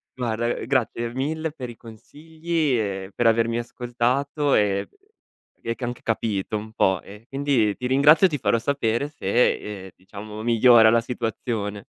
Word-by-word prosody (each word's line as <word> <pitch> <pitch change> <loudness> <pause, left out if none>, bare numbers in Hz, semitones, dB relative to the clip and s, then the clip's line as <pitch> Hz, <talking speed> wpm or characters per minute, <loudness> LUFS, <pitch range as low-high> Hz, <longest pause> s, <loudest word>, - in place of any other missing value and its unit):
Guarda, 120 -2 -2
uhm, 120 - -3
grazie 120 -2 -1
mille 155 +5 -2
per 130 -5 -8
i 120 - -10
consigli 155 +5 -3
e 95 -3 -3
per 120 - +2
avermi 115 +1 +2
ascoltato 125 +4 -1
e 100 -2 +1 0.8
e 115 0 -2
ch - - -21
anche 120 0 -4
capito 110 -2 -2
un 110 +1 -9
po' 95 -4 +1
e 105 +3 -14
quindi 135 -6 +1
ti 125 - -3
ringrazio 145 +7 +5
e - - -7
ti 150 - -2
farò 115 -3 +1
sapere 120 0 -1
se, 105 -6 -1
ehm, - - -10
diciamo 105 +3 -10
migliora 115 -1 +6
la 115 +1 +4
situazione. 115 -3 -4
120 Hz, 160 wpm, -23 LUFS, 110-135 Hz, 0.8 s, migliora